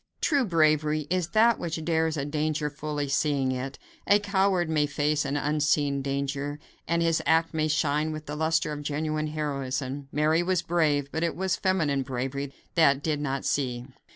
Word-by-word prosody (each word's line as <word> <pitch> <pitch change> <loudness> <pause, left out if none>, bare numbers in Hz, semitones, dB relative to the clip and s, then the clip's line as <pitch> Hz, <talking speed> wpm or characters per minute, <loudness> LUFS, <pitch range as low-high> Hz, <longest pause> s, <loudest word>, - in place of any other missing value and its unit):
True 285 -5 +2
bravery 155 -4 +2
is 180 -2 +1
that 220 +6 +4
which 160 -1 -4
dares 160 -1 +1
a 140 - -2
danger 150 0 -1
fully 150 0 -3
seeing 140 -2 +1
it. 130 +1 -4 0.3
A 205 - +6
coward 195 -3 +1
may 150 -2 +1
face 145 0 0
an 140 +1 -1
unseen 145 -1 +1
danger, 140 +1 -2 0.3
and 170 0 +1
his 165 -1 +2
act 165 +1 +3
may 155 -1 +1
shine 150 0 +1
with 155 0 -6
the 150 - -5
luster 160 0 +1
of 150 -1 -5
genuine 155 +1 -2
heroism. 140 -2 -3
Mary 155 +3 +2
was 180 -1 0
brave, 150 -5 +1
but 160 - -2
it 170 - 0
was 190 +1 -1
the - - -3
feminine 160 -8 +1
bravery 135 +2 -3 0.2
that 145 -4 +4
did 150 -2 -1
not 135 -2 -2
see. 125 -3 -1
150 Hz, 180 wpm, -27 LUFS, 140-160 Hz, 0.3 s, A